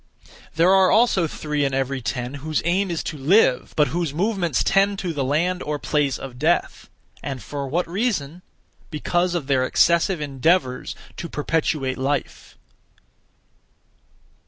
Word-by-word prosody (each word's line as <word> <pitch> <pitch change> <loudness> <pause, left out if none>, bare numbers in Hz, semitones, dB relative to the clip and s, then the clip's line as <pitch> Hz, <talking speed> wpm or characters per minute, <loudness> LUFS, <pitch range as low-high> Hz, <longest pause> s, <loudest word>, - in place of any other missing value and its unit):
There 170 +4 +4
are 190 -1 +5
also 215 -7 +3
three 150 -1 -3
in 135 -1 0
every 135 0 -1
ten 125 +1 -3
whose 155 0 -2
aim 190 +3 +1
is 170 -2 -2
to 155 - -5
live, 145 - +3
but 150 -1 +3
whose 165 -4 -2
movements 180 - 0
tend 195 +1 +2
to 180 -3 -3
the 140 -3 -2
land 170 +7 0
(or 150 0 -3
place) 140 +1 0
of 125 -2 -9
death. - - 0 0.3
And 135 -2 -5
for 140 +5 -5
what 170 +6 -1
reason? 180 - -2 0.5
Because 175 +3 -1
of 165 -5 -2
their 135 -2 +2
excessive 170 +6 +2
endeavours 140 -1 0 0.2
to 170 - -6
perpetuate 150 -3 -1
life. 135 +1 -3
155 Hz, 145 wpm, -22 LUFS, 135-180 Hz, 0.5 s, are